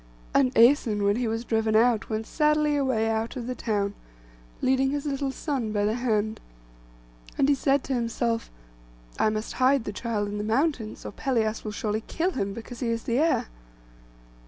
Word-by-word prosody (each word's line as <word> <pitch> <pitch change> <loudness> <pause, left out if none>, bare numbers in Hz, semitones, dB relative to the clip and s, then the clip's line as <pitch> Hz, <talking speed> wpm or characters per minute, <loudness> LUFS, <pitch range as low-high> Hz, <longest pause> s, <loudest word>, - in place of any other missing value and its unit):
And 260 -2 +4
Æson, 230 -3 +4
when 200 +2 +2
he 245 -1 0
was 225 +2 -2
driven 220 -1 +1
out, 225 0 +3
went 220 0 -2
sadly 300 +2 +2
away 260 -6 +1
out 225 +2 -1
of 245 -3 -5
the 255 - -3
town, 205 -5 -1 0.7
leading 265 +1 +2
his 285 +1 -2
little 275 -1 -1
son 265 -6 -3
by 205 -1 +1
the 215 - +1
hand; 220 -3 0 1.0
and 270 - +3
he 290 - +5
said 275 0 +1
to 270 - -3
himself, 230 -1 -1 0.7
'I - - +4
must 215 +1 -3
hide 265 0 +4
the 210 - -5
child 210 -2 -2
in 205 0 -4
the - - -2
mountains; 230 0 -1
or - - -5
Pelias 225 -5 -1
will 215 - -4
surely 215 +1 -2
kill 350 +3 0
him, 200 - -2
because 230 +3 -8
he 245 - -2
is 230 0 -1
the 235 +2 0
heir. 325 +2 +2
230 Hz, 185 wpm, -26 LUFS, 220-270 Hz, 1.0 s, he